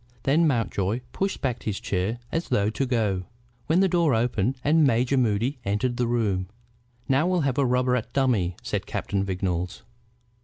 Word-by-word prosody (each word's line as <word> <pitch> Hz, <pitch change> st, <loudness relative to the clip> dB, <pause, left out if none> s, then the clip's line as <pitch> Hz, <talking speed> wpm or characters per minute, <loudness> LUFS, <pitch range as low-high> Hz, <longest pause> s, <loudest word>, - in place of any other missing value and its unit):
Then 160 Hz, +5 st, +3 dB
Mountjoy 115 Hz, -4 st, 0 dB
pushed 195 Hz, 0 st, -2 dB
back 125 Hz, -4 st, -1 dB
his 105 Hz, -3 st, -3 dB
chair 100 Hz, +4 st, -1 dB
as 165 Hz, +1 st, -2 dB
though 100 Hz, +1 st, +2 dB
to 135 Hz, +4 st, -1 dB
go, 105 Hz, -7 st, 0 dB, 0.4 s
when 170 Hz, +4 st, +3 dB
the 195 Hz, -, +4 dB
door 170 Hz, -7 st, +2 dB
opened 120 Hz, +2 st, 0 dB
and 155 Hz, +2 st, +4 dB
Major 125 Hz, 0 st, +2 dB
Moody 125 Hz, +2 st, +1 dB
entered 115 Hz, +5 st, -1 dB
the 120 Hz, -, +1 dB
room. 105 Hz, -6 st, 0 dB, 0.6 s
"Now 135 Hz, +5 st, +3 dB
we'll 180 Hz, -2 st, +2 dB
have 140 Hz, -2 st, 0 dB
a 140 Hz, -, +3 dB
rubber 125 Hz, 0 st, +2 dB
at 115 Hz, -1 st, -3 dB
dummy," 115 Hz, -11 st, +1 dB
said -, -, -3 dB
Captain 100 Hz, -1 st, -2 dB
Vignolles. 90 Hz, -2 st, -2 dB
120 Hz, 170 wpm, -25 LUFS, 100-135 Hz, 0.6 s, the